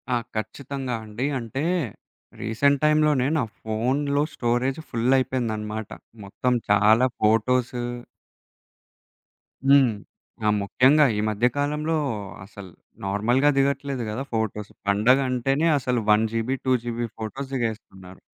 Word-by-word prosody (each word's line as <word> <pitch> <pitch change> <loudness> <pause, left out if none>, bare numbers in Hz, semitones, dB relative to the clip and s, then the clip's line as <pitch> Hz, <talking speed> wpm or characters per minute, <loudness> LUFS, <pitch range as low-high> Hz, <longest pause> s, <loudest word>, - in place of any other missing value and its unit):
ఆ! - - +3 0.2
ఖచ్చితంగా 130 +3 -4
అండి. 110 +4 -4
అంటే, 120 +5 -4 0.8
రీసెంట్ 140 +6 +2
టైమ్‌లోనే 150 -4 +3
నా 145 - +1 0.2
ఫోను‌లో 135 +6 0
స్టోరేజ్ 120 +4 0
ఫుల్లయిపోయిందనమాట. 115 -4 0 0.4
మొత్తం 125 +5 -1 0.2
చాలా 105 +4 +5 0.2
ఫోటోసు. 120 +3 +2 1.8
హ్మ్. 135 -4 +5 0.5
ఆ! - - +3
ముఖ్యంగా 130 +9 +4
ఈ - - 0
మధ్య 110 +2 0
కాలంలో 150 +3 0 0.5
అసల 100 0 -11 0.4
నార్మల్‌గా 120 +8 +2
దిగట్లేదు 140 -2 0
గదా! 115 +6 -3
ఫోటోస్. 105 -2 -2 0.2
పండగ 110 +7 +4
అంటేనే 135 +5 +1
అసలు 125 -1 -1
1 105 +1 +4
జీబీ 115 +4 -1
2 130 - +2
జీబీ 120 0 -2
ఫోటోస్ 130 +5 -6
దిగేస్తున్నారు. 105 -6 -5
125 Hz, 110 wpm, -24 LUFS, 110-135 Hz, 1.8 s, చాలా